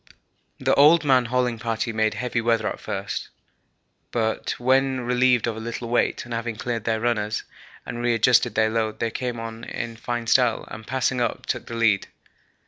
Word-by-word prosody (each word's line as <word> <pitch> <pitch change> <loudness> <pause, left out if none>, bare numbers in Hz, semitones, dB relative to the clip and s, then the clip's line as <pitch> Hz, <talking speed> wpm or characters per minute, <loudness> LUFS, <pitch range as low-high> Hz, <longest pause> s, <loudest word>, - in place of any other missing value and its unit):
The - - +2
old 155 +4 +6
man 130 -3 +4
hauling 125 -1 0
party 115 0 -2
made 110 -1 +1
heavy 120 +1 -1
weather 115 -1 +1
at - - -4
first, 100 0 -4 0.8
but 110 -2 -1
when 130 +1 +2
relieved 125 -1 +3
of 115 -2 -2
a - - -6
little 115 +1 -5
weight 120 - +1
and 120 - -7
having 115 0 -3
cleaned 115 -1 -3
their 110 -1 +1
runners 110 -2 -1 0.4
and 120 - -5
re 120 -1 +2
adjusted 115 +2 +3
their 110 0 +3
load 110 -1 -1
they 115 - -1
came 120 -1 -3
on 115 0 -7
in 115 -1 -5
fine 120 0 -4
style, 120 -1 +3
and, 110 -1 -9
passing 130 -1 0
us, 120 - -1
took - - -3
the 115 - -6
lead. 115 -4 +2
115 Hz, 185 wpm, -24 LUFS, 110-125 Hz, 0.8 s, old